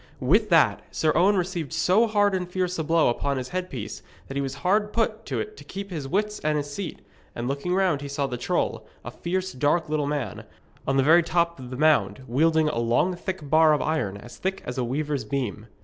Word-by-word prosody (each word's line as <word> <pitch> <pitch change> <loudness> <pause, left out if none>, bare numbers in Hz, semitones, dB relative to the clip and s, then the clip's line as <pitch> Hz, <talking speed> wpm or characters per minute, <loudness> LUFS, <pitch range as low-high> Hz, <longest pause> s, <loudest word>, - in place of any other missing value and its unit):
With 205 - +3
that 165 -3 +4
Sir 155 - +1
Owen 195 +3 +4
received 175 -5 -2
so 185 +8 +3
hard 205 -2 +2
and 180 -2 -2
fierce 180 -1 -1
a - - 0
blow 165 +1 +3
upon 140 +3 -1
his 130 -1 -4
headpiece 180 - -5 0.3
that 135 - -7
he 140 - 0
was 135 -1 -3
hard 210 +3 +2
put 225 -1 -1
to - - -2
it 430 0 -5
to - - -11
keep 200 0 -7
his 150 -6 -4
wits 210 +6 -1
and 150 0 0
his 145 -1 -4
seat; 195 +1 -5 0.3
and 120 +1 -3
looking 140 +7 -1
round 185 -7 +2
he 145 - -5
saw 140 0 -1
the 125 - -3
troll, - - -1 0.2
a - - -5
fierce 185 +2 -3
dark 150 +5 +1
little 150 -2 0
man, 145 -8 -3 0.4
on 135 0 +2
the 135 - +4
very 165 +5 +6
top 170 -1 0
of 125 -1 -8
the 130 - -6
mound, 130 -7 +2
wielding 160 +5 +3
a 135 - -1
long 120 +10 +2
thick 175 -3 -5
bar 155 +1 +5
of 150 - +1
iron, 130 -11 -1
as 120 +4 -12
thick 190 +1 -3
as 125 +1 -4
a - - +1
weaver's 145 +3 -2
beam. 125 -6 -3
155 Hz, 225 wpm, -25 LUFS, 135-185 Hz, 0.4 s, very